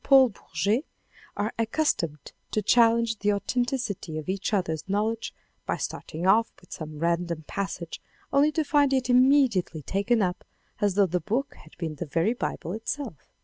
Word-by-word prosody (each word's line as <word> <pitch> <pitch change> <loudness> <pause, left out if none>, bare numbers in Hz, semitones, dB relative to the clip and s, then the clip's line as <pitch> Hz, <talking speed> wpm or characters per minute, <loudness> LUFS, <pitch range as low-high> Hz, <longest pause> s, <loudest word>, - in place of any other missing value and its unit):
Paul 265 -2 +7
Bourget, 215 +4 -1 0.5
are 210 +2 -1
ac 230 - +2
customed 165 - 0 0.2
to 215 - -1
challenge 230 0 +4
the 205 +1 +2
authenticity 210 - -2
of 155 +3 -6
each 195 +2 -1
other's 180 -4 -1
knowledge 215 +3 -1 0.4
by - - 0
starting 165 +3 -5
off 225 +4 +4
with 180 - -22
some 155 -1 -7
random 170 0 -1
passage 185 -3 -4 0.3
only 285 +2 +5
to 315 - +1
find 285 -2 +3
it 260 -1 +1
immediately 250 - +4
taken 205 - +1
up, 180 0 -2 0.4
as 205 -3 +1
though 200 -1 +5
the 180 0 0
book 245 - -1
had 155 - -18
been 160 -3 -4
the 165 - -4
very 165 +9 +1
Bible 180 -7 -4
itself. 225 - -5
205 Hz, 165 wpm, -27 LUFS, 170-245 Hz, 0.5 s, Paul